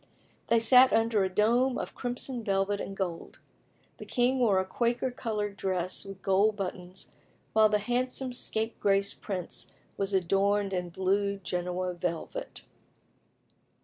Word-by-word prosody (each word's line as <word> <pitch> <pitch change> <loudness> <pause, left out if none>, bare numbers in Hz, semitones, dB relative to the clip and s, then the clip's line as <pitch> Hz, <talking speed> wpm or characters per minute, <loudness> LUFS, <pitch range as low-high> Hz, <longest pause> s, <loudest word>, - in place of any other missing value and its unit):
They 230 - +4
sat 250 +3 +7
under 225 -2 +2
a 190 - 0
dome 240 +7 +2
of - - -5
crimson 245 0 -4
velvet 200 0 0
and 195 - -6
gold. 175 -4 -4 0.6
The - - -9
king 255 +1 +2
wore 215 -6 +3
a 190 - -1
Quaker 240 +5 0
coloured 210 -5 -3
dress 185 -1 -2
with 195 -1 -10
gold 200 +3 +3
buttons, 185 -1 -6 0.4
while 215 0 +6
the 210 - +3
handsome 250 +4 -1
scapegrace 205 -4 0
prince 185 -4 -5 0.3
was 195 0 -1
adorned 195 +2 +1
in 180 -1 -2
blue 200 +3 0
Genoa 180 -1 -2
velvet. 175 - -5
200 Hz, 135 wpm, -29 LUFS, 190-235 Hz, 0.6 s, sat